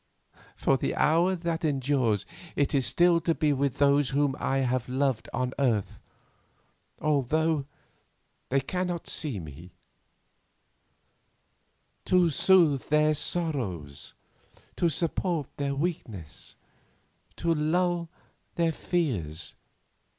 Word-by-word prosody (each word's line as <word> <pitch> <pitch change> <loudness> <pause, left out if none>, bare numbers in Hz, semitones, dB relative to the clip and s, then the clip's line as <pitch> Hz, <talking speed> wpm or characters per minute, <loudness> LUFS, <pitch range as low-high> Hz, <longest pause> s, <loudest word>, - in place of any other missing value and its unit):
For 135 - +2
the - - -2
hour 170 +4 +3
that 170 -1 -3
they 160 - +1
endure 135 -5 +1 0.4
it 145 +1 +1
is 135 -3 +2
still 175 -1 +4
to 165 -1 +1
be 150 -3 +2
with 140 0 -1
those 140 -1 +3
whom 140 -1 +1
I 135 - 0
have 130 -1 -1
loved 130 -3 0
on 125 +1 -2
earth, 115 -8 0 1.0
although 155 +1 +1 0.8
they 135 +1 +2
cannot 180 +3 -3
see 140 - -1
me; 80 +2 -11 2.3
to 180 -2 +3
soothe 160 -4 +4
their 150 +1 +4
sorrows, 110 - -4 0.6
to 170 - +2
support 165 -1 -2
their 140 -1 -1
weakness, 120 - -5 0.8
to 170 -1 +1
lull 170 +2 0 0.5
their 165 -1 +2
fears. 110 - -2
145 Hz, 105 wpm, -28 LUFS, 130-165 Hz, 2.3 s, still